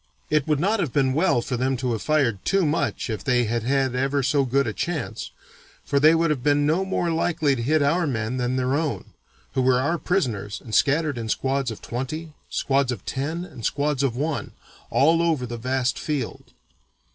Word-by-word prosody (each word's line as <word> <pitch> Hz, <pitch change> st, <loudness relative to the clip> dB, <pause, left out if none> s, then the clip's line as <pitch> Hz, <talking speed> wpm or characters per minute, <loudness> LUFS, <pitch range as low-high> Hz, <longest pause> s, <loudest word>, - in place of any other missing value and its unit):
It 150 Hz, -1 st, +2 dB
would 150 Hz, -2 st, +2 dB
not 205 Hz, +7 st, +1 dB
have 155 Hz, -9 st, -1 dB
been 130 Hz, -1 st, +2 dB
well 155 Hz, -6 st, +2 dB
for 125 Hz, -, -2 dB
them 130 Hz, +1 st, 0 dB
to 125 Hz, 0 st, -1 dB
have 110 Hz, -3 st, -2 dB
fired 135 Hz, -10 st, +1 dB
too 195 Hz, -2 st, +2 dB
much 150 Hz, +2 st, -1 dB
if 110 Hz, -3 st, -4 dB
they 125 Hz, -1 st, +2 dB
had 115 Hz, +1 st, -1 dB
had 135 Hz, +1 st, +1 dB
ever 135 Hz, +2 st, 0 dB
so 140 Hz, +1 st, +2 dB
good 135 Hz, +2 st, +2 dB
a -, -, -2 dB
chance, 165 Hz, -7 st, -3 dB, 0.6 s
for 140 Hz, -, +1 dB
they 155 Hz, +3 st, +6 dB
would 165 Hz, -1 st, +2 dB
have 140 Hz, -5 st, -1 dB
been 145 Hz, +1 st, +2 dB
no 160 Hz, +6 st, +2 dB
more 185 Hz, -3 st, -1 dB
likely 160 Hz, -3 st, +1 dB
to 120 Hz, -, -4 dB
hit 150 Hz, +5 st, +2 dB
our 165 Hz, +4 st, +2 dB
men 115 Hz, -1 st, -2 dB
than 125 Hz, 0 st, -1 dB
their 130 Hz, 0 st, 0 dB
own, 150 Hz, 0 st, -2 dB, 0.4 s
who 130 Hz, -, +1 dB
were 130 Hz, -1 st, +3 dB
our 160 Hz, +6 st, 0 dB
prisoners 115 Hz, -, -1 dB
and 110 Hz, -, -11 dB
scattered 145 Hz, -1 st, +2 dB
in 110 Hz, -1 st, -4 dB
squads 135 Hz, +2 st, 0 dB
of 110 Hz, -, -8 dB
twenty, 150 Hz, +6 st, -5 dB, 0.2 s
squads 135 Hz, -2 st, +1 dB
of 115 Hz, -6 st, -6 dB
ten, 160 Hz, +6 st, -3 dB
and 120 Hz, -9 st, -11 dB
squads 145 Hz, +1 st, 0 dB
of 135 Hz, -4 st, 0 dB
one, 150 Hz, +3 st, -2 dB, 0.4 s
all 165 Hz, +4 st, +4 dB
over 160 Hz, -7 st, +1 dB
the 120 Hz, 0 st, -5 dB
vast 130 Hz, +2 st, -1 dB
field. 145 Hz, -6 st, -3 dB
140 Hz, 205 wpm, -24 LUFS, 125-155 Hz, 0.6 s, they